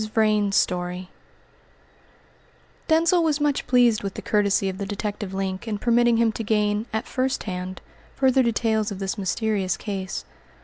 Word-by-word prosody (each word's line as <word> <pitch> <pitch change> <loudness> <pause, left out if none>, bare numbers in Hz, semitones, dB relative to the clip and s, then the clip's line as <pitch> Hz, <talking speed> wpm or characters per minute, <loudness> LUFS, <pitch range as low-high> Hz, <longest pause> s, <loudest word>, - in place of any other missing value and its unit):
VRAIN'S 210 -2 +2
STORY 180 0 -1 1.8
Denzil 335 +2 +4
was 310 -2 +1
much 290 -2 0
pleased 245 -3 +4
with 195 -1 -5
the - - -5
courtesy 200 -2 +2
of 190 0 -4
the 200 - -2
detective 205 -1 -4
Link 190 +2 -3
in 215 -2 -2
permitting 235 +1 +3
him 230 -1 +3
to 225 - -5
gain, 210 0 0
at 220 +2 -2
first 260 0 -1
hand, 185 -1 -5 0.3
further 265 -1 +3
details 220 -2 +1
of 200 - -5
this 190 0 -3
mysterious 195 -1 -1
case. 195 -2 -5
210 Hz, 150 wpm, -24 LUFS, 195-235 Hz, 1.8 s, Denzil